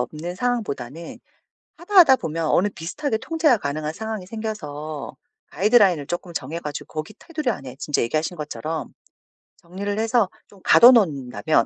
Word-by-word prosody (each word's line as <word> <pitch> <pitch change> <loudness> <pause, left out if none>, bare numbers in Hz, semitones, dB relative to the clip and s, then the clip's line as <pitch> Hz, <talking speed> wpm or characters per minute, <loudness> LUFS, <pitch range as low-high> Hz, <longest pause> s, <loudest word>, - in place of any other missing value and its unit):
없는 155 +8 -4
상황보다는 170 - -3 0.6
하다 360 +4 -9
하다 280 -7 +8
보면 165 -5 -3
어느 185 +6 +3
비슷하게 220 - -3
통제가 310 -2 +2
가능한 150 -1 -3
상황이 220 0 -5
생겨서 155 -10 -6 0.3
가이드라인을 195 - +3
쪼끔 175 +2 -5
정해 150 +3 -4
가지고 150 -3 -7
거기 155 0 -5
테두리 305 -6 -3
안에 130 - -6
진짜 150 - 0
얘기하신 155 +8 -1
것처럼 155 +1 -5 0.7
정리를 200 +4 -5
해서 225 -2 +2 0.2
좀 200 - -19
가둬 240 +2 +8
놓는다면 150 - +2
175 Hz, 370 characters per minute, -23 LUFS, 150-220 Hz, 0.7 s, 하다